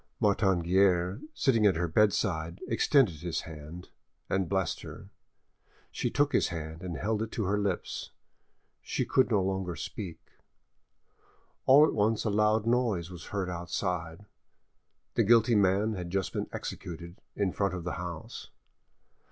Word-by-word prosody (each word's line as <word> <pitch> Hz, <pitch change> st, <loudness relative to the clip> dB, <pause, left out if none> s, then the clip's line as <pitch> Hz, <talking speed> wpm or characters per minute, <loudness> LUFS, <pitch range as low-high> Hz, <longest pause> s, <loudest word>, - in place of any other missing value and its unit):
Martin 95 Hz, -3 st, +2 dB
Guerre, 90 Hz, +3 st, +2 dB
sitting 115 Hz, -7 st, +3 dB
at 95 Hz, -, +3 dB
her 85 Hz, +2 st, 0 dB
bedside, 85 Hz, -3 st, +1 dB
extended 115 Hz, -, +3 dB
his 85 Hz, +2 st, -3 dB
hand 80 Hz, +2 st, -10 dB, 0.4 s
and 95 Hz, -3 st, 0 dB
blessed 95 Hz, -1 st, -1 dB
her. -, -, -10 dB, 0.8 s
She -, -, -1 dB
took 145 Hz, 0 st, +1 dB
his -, -, +3 dB
hand 80 Hz, -1 st, -6 dB
and 90 Hz, -4 st, -5 dB
held 105 Hz, +7 st, -1 dB
it 110 Hz, -, -3 dB
to 110 Hz, -, -1 dB
her 100 Hz, +2 st, 0 dB
lips; 100 Hz, -3 st, -3 dB, 0.7 s
she -, -, -2 dB
could 130 Hz, -, +3 dB
no 105 Hz, -5 st, +2 dB
longer 95 Hz, -2 st, -2 dB
speak. 85 Hz, +3 st, -6 dB, 1.5 s
All 140 Hz, +3 st, +8 dB
at -, -, -1 dB
once 110 Hz, +1 st, +1 dB
a 110 Hz, -, +1 dB
loud 105 Hz, +1 st, +2 dB
noise 115 Hz, -8 st, +1 dB
was 90 Hz, -2 st, -9 dB
heard 100 Hz, -2 st, -3 dB
outside: 85 Hz, +1 st, -3 dB, 0.9 s
the -, -, +2 dB
guilty 115 Hz, +2 st, +5 dB
man 100 Hz, +1 st, +3 dB
had 90 Hz, -3 st, -5 dB
just 95 Hz, +1 st, -2 dB
been -, -, -3 dB
executed 85 Hz, +1 st, -7 dB
in 100 Hz, -3 st, 0 dB
front 100 Hz, -2 st, 0 dB
of 90 Hz, -, -5 dB
the 90 Hz, -, -3 dB
house. 85 Hz, -3 st, -7 dB
95 Hz, 150 wpm, -29 LUFS, 85-105 Hz, 1.5 s, All